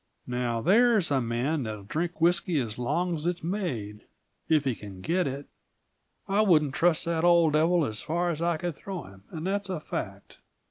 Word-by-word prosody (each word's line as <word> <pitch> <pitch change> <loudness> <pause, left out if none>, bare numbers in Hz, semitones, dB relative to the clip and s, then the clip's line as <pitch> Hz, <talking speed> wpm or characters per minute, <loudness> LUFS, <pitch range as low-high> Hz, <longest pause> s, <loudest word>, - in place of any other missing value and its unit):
Now, 120 -2 -2
there's 215 - +4
a 135 -2 +2
man 125 +6 -1
that'll 110 -4 -5
drink 165 - -3
whisky 175 -1 +2
as 115 -3 -4
long 175 +9 0
as 160 0 -3
it's 175 -1 -2
made, 140 - -3 0.4
if 155 -3 +4
he 135 -3 0
can 100 -4 -10
get 175 - 0
it. 140 +1 -5 0.8
I 200 +2 +2
wouldn't 155 -9 +3
trust 170 +1 +2
that 165 -1 -1
old 170 -3 +5
devil 165 +1 +3
as 110 -4 -3
far 175 +2 -1
as 160 -1 -5
I 170 -1 +1
can 175 +1 -3
throw 185 +2 -7
him, 95 -1 -15
and 160 0 -6
that's 200 +1 -1
a 185 -4 -2
fact. - - -6
160 Hz, 190 wpm, -27 LUFS, 125-175 Hz, 0.8 s, old